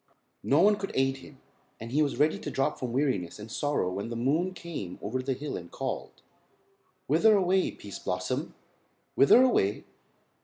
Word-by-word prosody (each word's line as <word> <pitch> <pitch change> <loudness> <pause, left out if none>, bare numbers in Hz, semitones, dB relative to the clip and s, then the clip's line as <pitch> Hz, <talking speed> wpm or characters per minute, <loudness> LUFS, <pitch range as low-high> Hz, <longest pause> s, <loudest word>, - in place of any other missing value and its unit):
No 145 +4 +3
one 205 +2 +5
could 195 - -5
aid 135 0 +1
him, 135 +1 -14 0.4
and 115 +1 -8
he 150 +4 +2
was 145 -2 0
ready 155 +1 +2
to - - -5
drop 135 - -1
from 125 -2 -3
weariness 125 - -1
and 105 +1 -10
sorrow 145 -9 -1
when 100 +4 -4
the 120 - -4
moon 150 +10 +1
came 150 - -6
over 125 +5 -3
the 135 +1 -1
hill 145 +3 -5
and 85 -1 -7
called: - - -5 0.8
"Whither 210 +9 +4
away, 190 0 +2
Pease 100 - -9
Blossom? 90 0 -3 0.6
Whither 230 - +6
away?" 105 - +2
135 Hz, 175 wpm, -28 LUFS, 110-160 Hz, 0.8 s, Whither